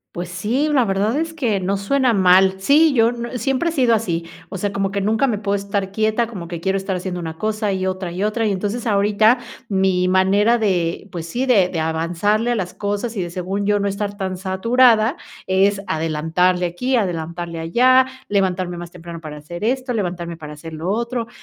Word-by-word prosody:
Pues 175 Hz, 0 st, -4 dB
sí, 215 Hz, +11 st, -1 dB
la 260 Hz, -4 st, +4 dB
verdad 200 Hz, +3 st, 0 dB
es 325 Hz, 0 st, -3 dB
que 235 Hz, -10 st, 0 dB
no 190 Hz, +2 st, -1 dB
suena 250 Hz, +5 st, +1 dB
mal, 190 Hz, -1 st, +5 dB
sí, 295 Hz, +9 st, +4 dB
yo 225 Hz, -1 st, +5 dB
n 240 Hz, +1 st, -5 dB
siempre 270 Hz, +8 st, 0 dB
he -, -, -3 dB
sido 255 Hz, -7 st, +3 dB
así, 175 Hz, -7 st, -1 dB, 0.2 s
o 195 Hz, -, -5 dB
sea, 200 Hz, +2 st, -2 dB
como 195 Hz, 0 st, 0 dB
que 200 Hz, 0 st, -2 dB
nunca 220 Hz, +6 st, +2 dB
me 225 Hz, -5 st, 0 dB
puedo 200 Hz, -1 st, -1 dB
estar 200 Hz, -1 st, -2 dB
quieta, 220 Hz, +3 st, +1 dB
como 195 Hz, -7 st, -8 dB
que 170 Hz, -1 st, -5 dB
quiero 190 Hz, +2 st, 0 dB
estar 190 Hz, 0 st, -3 dB
haciendo 180 Hz, 0 st, -4 dB
una 160 Hz, -2 st, -6 dB
cosa, 215 Hz, +2 st, -1 dB
y 190 Hz, 0 st, -2 dB
otra 185 Hz, -1 st, -3 dB
y 180 Hz, +3 st, -3 dB
otra, 215 Hz, +1 st, 0 dB
y -, -, +1 dB
entonces 205 Hz, +5 st, -3 dB
ahorita 210 Hz, +3 st, +3 dB, 0.3 s
mi 190 Hz, -3 st, +1 dB
manera 195 Hz, +5 st, +3 dB
de, 185 Hz, -5 st, -1 dB
pues 170 Hz, -2 st, -6 dB
sí, 245 Hz, +9 st, -2 dB
de 205 Hz, -8 st, +4 dB
de 170 Hz, -, -3 dB
avanzarle 170 Hz, +8 st, 0 dB
a -, -, -1 dB
las 185 Hz, -5 st, -3 dB
cosas 205 Hz, +3 st, -3 dB
y -, -, 0 dB
de 175 Hz, -, -3 dB
según 190 Hz, +3 st, -3 dB
yo 205 Hz, 0 st, +3 dB
no 200 Hz, -, 0 dB
estar 200 Hz, 0 st, -3 dB
tan 190 Hz, -2 st, -3 dB
saturada, 225 Hz, -, +3 dB, 0.3 s
es 195 Hz, +2 st, +2 dB
adelantarle 165 Hz, +3 st, 0 dB
aquí, 250 Hz, +10 st, -1 dB
adelantarle 170 Hz, -4 st, -2 dB
allá, 255 Hz, +10 st, +4 dB, 0.2 s
levantarme 185 Hz, -3 st, 0 dB
más 175 Hz, 0 st, -7 dB
temprano 170 Hz, -1 st, -10 dB
para 155 Hz, -2 st, -8 dB
hacer 170 Hz, +5 st, -8 dB
esto, 255 Hz, +2 st, 0 dB
levantarme 175 Hz, -5 st, -3 dB
para 150 Hz, -2 st, -9 dB
hacer 160 Hz, +2 st, -10 dB
lo 160 Hz, +3 st, -4 dB
otro, 235 Hz, +2 st, -2 dB
195 Hz, 205 wpm, -20 LUFS, 180-225 Hz, 0.3 s, mal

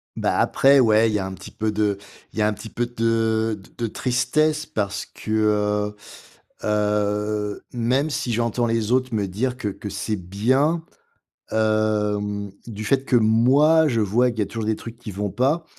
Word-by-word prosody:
Bah -, -, 0 dB
après 140 Hz, +1 st, +5 dB
ouais, 110 Hz, -2 st, +4 dB
il -, -, -2 dB
y 105 Hz, -, +1 dB
a 95 Hz, -, -2 dB
un 95 Hz, -, -5 dB
petit 95 Hz, -, -10 dB
peu 110 Hz, 0 st, -2 dB
de 105 Hz, -1 st, 0 dB, 0.4 s
il -, -, -5 dB
y -, -, +3 dB
a 105 Hz, -, +4 dB
un 105 Hz, -, 0 dB
petit 110 Hz, +2 st, -9 dB
peu 120 Hz, -, -2 dB
de 115 Hz, -2 st, 0 dB
d 95 Hz, -, -18 dB
de 115 Hz, -, -1 dB
tristesse 150 Hz, +7 st, 0 dB
parce 100 Hz, -1 st, -3 dB
que, 110 Hz, -, -9 dB
heu 105 Hz, -1 st, +1 dB, 0.7 s
heu, 105 Hz, 0 st, 0 dB
même 125 Hz, +5 st, +1 dB
si 125 Hz, -4 st, -2 dB
j'entends 115 Hz, +1 st, 0 dB
les 115 Hz, -1 st, 0 dB
autres 130 Hz, -1 st, +1 dB
me 100 Hz, -2 st, 0 dB
dire 120 Hz, +7 st, -2 dB
que 120 Hz, -, -3 dB
que 105 Hz, +1 st, -7 dB
c'est 105 Hz, +2 st, -3 dB
bien, 130 Hz, -, +1 dB, 0.7 s
hem, 105 Hz, -2 st, 0 dB
du 110 Hz, -2 st, -6 dB
fait, 135 Hz, +5 st, +1 dB
que 130 Hz, -, +2 dB
moi 135 Hz, +8 st, +4 dB
je 115 Hz, -5 st, +1 dB
vois 115 Hz, +5 st, +2 dB
qu'il 115 Hz, -2 st, -4 dB
y -, -, +3 dB
a -, -, -1 dB
toujours 115 Hz, +1 st, -5 dB
des 110 Hz, 0 st, +1 dB
trucs 115 Hz, 0 st, -10 dB
qui 120 Hz, -3 st, -8 dB
vont 100 Hz, +1 st, -3 dB
pas 140 Hz, -, +1 dB
110 Hz, 195 wpm, -23 LUFS, 105-120 Hz, 0.7 s, après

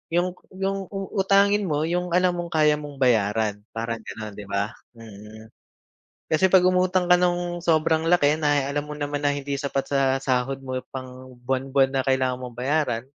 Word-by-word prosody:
yung 175 Hz, +1 st, +3 dB, 0.3 s
yung 195 Hz, +1 st, -1 dB
uutangin 195 Hz, 0 st, +1 dB
mo 150 Hz, -1 st, 0 dB
yung 175 Hz, +1 st, -1 dB
alam 180 Hz, 0 st, +3 dB
mong 170 Hz, -1 st, -5 dB
kaya 150 Hz, -1 st, +4 dB
mong 145 Hz, -1 st, -8 dB
bayaran, 110 Hz, -4 st, +1 dB, 0.2 s
parang 115 Hz, 0 st, -3 dB
ganon 110 Hz, -1 st, -8 dB
'di 100 Hz, -, -9 dB
ba? 100 Hz, +2 st, -1 dB, 0.2 s
Mm, 110 Hz, 0 st, -13 dB, 0.8 s
kasi 175 Hz, +4 st, +3 dB
pag 185 Hz, -1 st, +6 dB
umutang 185 Hz, 0 st, +2 dB
ka 180 Hz, -, +6 dB
nung 175 Hz, -1 st, 0 dB
sobrang 160 Hz, -1 st, +2 dB
laki 150 Hz, -4 st, +4 dB
na 145 Hz, -2 st, +2 dB
alam 145 Hz, +1 st, -2 dB
mo 150 Hz, -, -6 dB
naman 145 Hz, 0 st, -3 dB
na 145 Hz, -, +2 dB
hindi 140 Hz, 0 st, -3 dB
sapat 140 Hz, -1 st, -2 dB
sa 140 Hz, -1 st, 0 dB, 0.2 s
sahod 135 Hz, 0 st, -1 dB
mo 130 Hz, -1 st, -3 dB
pang 130 Hz, -1 st, -9 dB
buwan-buwan 135 Hz, +1 st, +1 dB
na 135 Hz, -, +2 dB
kailangan 130 Hz, -1 st, 0 dB
mong 125 Hz, -1 st, -9 dB
bayaran, 130 Hz, -3 st, 0 dB
145 Hz, 175 wpm, -24 LUFS, 125-175 Hz, 0.8 s, pag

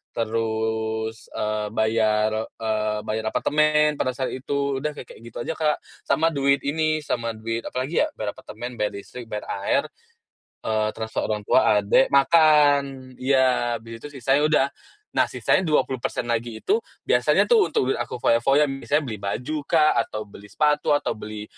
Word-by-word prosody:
terus, 110 Hz, 0 st, -2 dB
eee, 105 Hz, 0 st, -2 dB
bayar, 110 Hz, -1 st, +2 dB
eee, 110 Hz, -1 st, -2 dB
bayar 110 Hz, 0 st, -3 dB
apartemen, 150 Hz, 0 st, +2 dB
pada 130 Hz, -, -1 dB
saat 130 Hz, +1 st, -3 dB
itu, 140 Hz, +1 st, -2 dB
udah 150 Hz, +2 st, -3 dB
kayak 130 Hz, -, -10 dB
kayak -, -, -13 dB
gitu 115 Hz, -, -10 dB
aja, 165 Hz, -, -3 dB
Kak. 150 Hz, -2 st, +1 dB, 0.3 s
Sama 165 Hz, +1 st, +2 dB
duit 140 Hz, -2 st, +1 dB
ini 155 Hz, +1 st, 0 dB
sama 115 Hz, -4 st, -2 dB
duit 115 Hz, +1 st, -4 dB
apalagi 130 Hz, +6 st, -2 dB
ya? -, -, -4 dB
Bayar 105 Hz, -1 st, -3 dB
apartemen, 120 Hz, +2 st, -8 dB
bayar 105 Hz, -1 st, -1 dB
listrik, 120 Hz, +4 st, -9 dB
bayar 105 Hz, -2 st, -5 dB, 0.2 s
air, -, -, +2 dB, 0.8 s
eee, 110 Hz, -1 st, 0 dB
transfer 110 Hz, 0 st, -4 dB
orang 105 Hz, -1 st, -2 dB
tua, 110 Hz, -1 st, +4 dB
adek, 105 Hz, +6 st, +4 dB
makan, 140 Hz, -3 st, +4 dB
iya, 130 Hz, -2 st, +2 dB
abis 115 Hz, +1 st, -10 dB
itu -, -, -7 dB
sisanya 135 Hz, +4 st, +2 dB
udah. 145 Hz, -3 st, +3 dB, 0.5 s
Nah, -, -, +5 dB
sisanya 190 Hz, -, +1 dB
20% 130 Hz, -5 st, 0 dB
lagi 115 Hz, -1 st, -2 dB
itu 425 Hz, +4 st, +2 dB, 0.2 s
biasanya -, -, +3 dB
tuh 450 Hz, -4 st, +5 dB
untuk 130 Hz, +1 st, +1 dB
aku -, -, -4 dB
foya-foya, 135 Hz, +5 st, +3 dB
misalnya 140 Hz, +2 st, -1 dB
beli 110 Hz, -3 st, -5 dB
baju 125 Hz, +10 st, -3 dB
kah, 155 Hz, -2 st, +4 dB
atau 110 Hz, 0 st, -3 dB
beli 105 Hz, 0 st, -14 dB
sepatu, 150 Hz, +3 st, +2 dB
atau -, -, -1 dB
beli 105 Hz, 0 st, -7 dB
125 Hz, 160 wpm, -24 LUFS, 110-145 Hz, 0.8 s, Nah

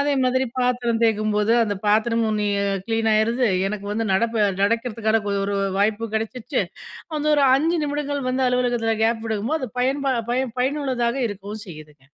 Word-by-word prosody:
அதே 290 Hz, +1 st, +1 dB
மாதிரி 260 Hz, +1 st, +2 dB
பாத்திரம் 245 Hz, -2 st, 0 dB
தேய்க்கும்போது, 215 Hz, -1 st, +2 dB
அந்த 205 Hz, -, -2 dB
பாத்திரமும் 220 Hz, +1 st, +2 dB
நீ 210 Hz, -, 0 dB, 0.4 s
கிளீன் 225 Hz, -1 st, +1 dB
ஆயிருது, 230 Hz, +3 st, +2 dB, 0.2 s
எனக்கு 200 Hz, 0 st, -5 dB
வந்து 225 Hz, +2 st, -1 dB
நடப்ப 230 Hz, +4 st, +1 dB, 0.3 s
நடக்கிறதுக்கான 225 Hz, 0 st, +1 dB
கொ 200 Hz, -, -1 dB
ஒரு 200 Hz, 0 st, -1 dB, 0.2 s
வாய்ப்பும் 215 Hz, +2 st, 0 dB
கிடைச்சிடுச்சு, 225 Hz, +2 st, -2 dB, 0.6 s
அந்த 295 Hz, -, -3 dB
ஒரு 290 Hz, -, +3 dB
5 330 Hz, +5 st, +1 dB
நிமிடங்கள் 285 Hz, -2 st, -2 dB
வந்து 260 Hz, +1 st, 0 dB
அலுவலகத்தில 245 Hz, -3 st, +1 dB
கேப் 225 Hz, 0 st, +1 dB
விடுக்கும்போது, 225 Hz, +8 st, -1 dB
அது 260 Hz, -, -4 dB
பயன்பா 270 Hz, +1 st, +1 dB, 0.2 s
பயன் 250 Hz, -1 st, -1 dB
பயனுள்ளதாக 260 Hz, -3 st, 0 dB
இருக்கவும் 205 Hz, +1 st, -7 dB
செய்யுதுங்க. 150 Hz, -4 st, -12 dB
230 Hz, 155 wpm, -22 LUFS, 215-255 Hz, 0.6 s, ஒரு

